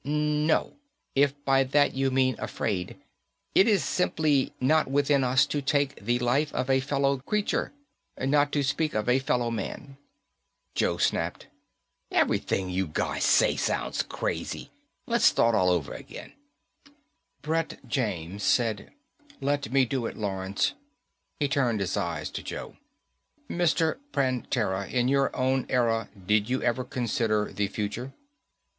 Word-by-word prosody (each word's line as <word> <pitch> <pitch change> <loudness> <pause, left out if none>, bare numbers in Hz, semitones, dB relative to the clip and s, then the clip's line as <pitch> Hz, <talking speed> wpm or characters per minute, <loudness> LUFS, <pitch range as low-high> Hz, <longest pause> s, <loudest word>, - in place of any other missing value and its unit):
"No, 150 - 0 0.4
if 140 0 +3
by 135 0 +4
that 145 +2 +2
you 135 0 +1
mean 130 -1 +2
afraid. 95 -5 -3 0.5
It 195 - +5
is 200 -8 +3
simply 150 -3 +1
not 155 +5 +3
within 140 0 +2
us 130 +2 +4
to 145 0 -2
take 140 -5 0
the 120 +3 +1
life 125 +5 +1
of 130 - 0
a 130 - +4
fellow 140 0 +1
creature 210 +10 -1 0.5
not 145 +1 +2
to 145 - +1
speak 150 +2 0
of 110 +1 -1
a 125 +2 +4
fellow 125 -3 0
man." 115 +5 -5 0.8
Joe - - +1
snapped: - - -1 0.6
"Everything 95 -1 +1
you 95 0 -1
guys 75 - -2
say - - +4
sounds - - -1
crazy. - - -4 0.3
Let's - - +2
start 115 - +4
all 90 -3 +3
over 85 -5 0
again." - - -10 1.1
Brett 160 +2 -1
James 100 - -2
said, 110 -2 +1 0.5
"Let 140 -3 -1
me 135 -1 +4
do 120 -1 -2
it, - - -7
Lawrence." 95 -2 -1 0.7
He 145 - +2
turned 125 -5 +1
his 95 -2 -1
eyes 85 -1 -3
to - - -5
Joe. - - -7 0.7
"Mr. 170 0 +1
Prantera, 120 -7 -1
in 125 -1 +1
your 140 0 +3
own 130 0 +1
era, 115 -3 +1 0.2
did 105 +2 +2
you 130 +1 +1
ever 120 +2 +1
consider 115 -4 -1
the 100 -1 0
future?" 105 +6 -4
130 Hz, 140 wpm, -27 LUFS, 110-140 Hz, 1.1 s, It